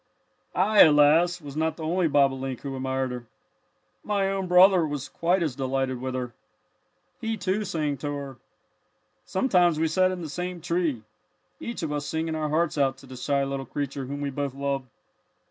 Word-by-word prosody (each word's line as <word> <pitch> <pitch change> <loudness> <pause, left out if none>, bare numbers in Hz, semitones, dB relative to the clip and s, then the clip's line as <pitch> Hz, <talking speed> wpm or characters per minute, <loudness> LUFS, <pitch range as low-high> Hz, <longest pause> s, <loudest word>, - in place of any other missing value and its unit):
"I, 205 +4 +3
alas, 160 +4 +5
was 145 -3 -10
not 160 0 -1
the 160 - -7
only 170 +2 +1
bobolink 135 -3 +1
who 135 -1 -5
admired 130 0 -2
her. 125 -1 -6 0.8
My 200 -2 0
own 195 -1 -2
brother 180 0 +6
was 145 -3 -3
quite 175 +1 +1
as 150 -6 -2
delighted 130 -1 -2
with 130 0 -3
her. 125 -2 -4 0.9
He, 225 0 -2
too, 195 +2 -1
sang 150 -6 -2
to 145 +3 -4
her. 140 -2 -7 0.9
"Sometimes 180 -6 +2
we 160 - +2
sat 185 +3 +3
in 185 -2 -4
the - - -4
same 180 +4 -4
tree, 165 -8 -1 0.6
each 235 -6 -5
of 155 - -2
us 145 -1 -3
singing 160 0 -2
our 155 -1 -2
hearts 155 0 0
out 135 -2 +2
to 135 - -15
the 130 0 -10
shy 140 +2 0
little 135 -1 -4
creature 140 -1 -4
whom 140 +1 -5
we 140 -1 -2
both 140 -1 -3
loved. 140 -1 -2
150 Hz, 180 wpm, -26 LUFS, 135-175 Hz, 0.9 s, brother